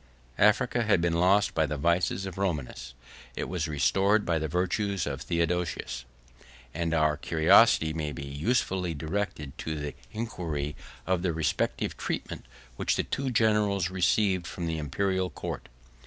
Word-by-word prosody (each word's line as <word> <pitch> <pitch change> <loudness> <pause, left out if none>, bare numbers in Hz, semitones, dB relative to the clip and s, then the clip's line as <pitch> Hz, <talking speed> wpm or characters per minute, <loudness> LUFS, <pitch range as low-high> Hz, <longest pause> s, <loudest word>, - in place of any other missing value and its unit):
] - - -30
Africa 120 +3 0
had 105 -5 +3
been 85 0 +1
lost 95 +5 +3
by 80 -1 +2
the 75 - -3
vices 85 +5 +1
of 95 -1 -7
Romanus; 70 -8 -3 0.4
it - - -2
was - - -2
restored 95 - +2
by 85 -2 +1
the 80 - -2
virtues 95 +3 0
of 70 -3 -4
Theodosius; 85 -6 -2 0.7
and 85 0 -1
our 75 -1 +3
curiosity 80 0 +4
may 75 -2 -3
be 70 - -6
usefully 90 - -1
directed 80 -3 -3
to 80 - -3
the 75 -1 -4 0.2
inquiry 85 -10 -3 0.3
of 95 -2 +1
the 90 -2 0
respective 80 -2 -1
treatment - - -4 0.3
which - - +1
the - - 0
two 135 -1 -2
generals 105 -6 +2
received 95 0 +2
from 85 - -5
the 80 -1 -2
Imperial 95 +5 -1
court. - - -6
85 Hz, 155 wpm, -28 LUFS, 75-95 Hz, 0.7 s, curiosity